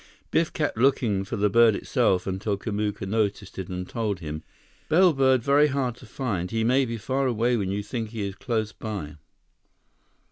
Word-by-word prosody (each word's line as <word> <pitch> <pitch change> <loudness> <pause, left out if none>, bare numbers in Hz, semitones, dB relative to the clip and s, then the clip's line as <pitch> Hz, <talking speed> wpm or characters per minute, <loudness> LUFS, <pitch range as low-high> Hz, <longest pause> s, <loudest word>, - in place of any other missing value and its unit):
Biff 165 0 +2
kept 150 -7 -2
looking 115 -6 +2
for 95 - -5
the 105 +1 +2
bird 115 +1 +5
itself 90 -2 +1
until 95 +2 -2
Kamuka 105 0 -3
noticed 105 -2 -1
it 95 - -5
and 90 0 -4
told 110 -4 -2
him: 75 -2 -5 0.5
"Bellbird 135 -7 +4
very 145 +3 +5
hard 135 -4 -1
to - - -14
find. 100 -10 -3
He 115 0 -1
may 130 +4 +3
be 115 -1 -4
far 130 +4 -1
away 120 0 +1
when 100 -5 -1
you 100 +1 -2
think 110 +1 -4
he 110 -2 -4
is 100 - -5
close 110 -1 -2
by." 95 -10 -6
110 Hz, 180 wpm, -25 LUFS, 100-130 Hz, 0.5 s, bird